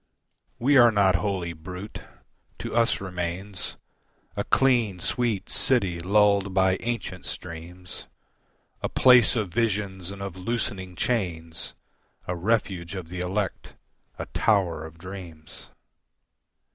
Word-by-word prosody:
We 140 +4 +4
are 120 -2 +8
not 95 -4 +4
wholly 90 -1 -2
brute. 90 +6 -8 0.6
To - - -5
us 115 +1 +4
remains 90 +1 -4 0.6
A - - -1
clean, 120 -8 +3
sweet 115 +1 0
city 100 -10 +2
lulled 100 +1 +3
by 95 0 +4
ancient 115 -7 -4
streams, 90 +1 -7 0.7
A - - -1
place 125 -3 +6
of 105 -7 -2
visions 100 -5 -1
and 100 0 -7
of 100 -3 -5
loosening 95 -2 -2
chains, 85 -10 -2 0.5
A 90 - -1
refuge 95 -2 -1
of 90 -3 -6
the 90 0 -5
elect, 95 +1 -3 0.4
a - - -4
tower 85 -7 +1
of 80 +1 -15
dreams. 90 -4 -9
95 Hz, 120 wpm, -26 LUFS, 90-105 Hz, 0.7 s, are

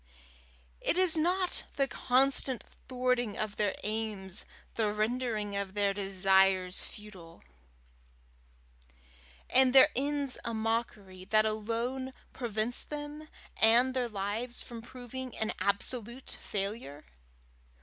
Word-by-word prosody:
Is 360 -2 +4
it - - +1
not 360 +2 +1
the 275 -1 +2
constant 265 0 +2 0.3
thwarting 250 -4 0
of 215 -1 -3
their 205 -2 +1
aims, 210 -3 -3 0.3
the 215 -2 0
rendering 215 -1 -1
of 200 -1 -3
their 200 -1 +2
desires 190 -1 +2
futile, 185 -6 -11 2.0
and 255 0 +4
their 270 +2 +8
ends 280 0 +1
a 235 - -3
mockery, 220 -4 -3
that 215 +2 +3
alone 235 +5 -2 0.2
prevents 230 -1 -1
them 295 +1 -7 0.3
and 240 +4 +5
their 250 -2 -1
lives 215 +4 -3
from 235 -2 -7
proving 255 +1 -8
an 220 - -1
absolute 235 +5 0
failure? 195 - -4
225 Hz, 110 wpm, -31 LUFS, 205-255 Hz, 2.0 s, their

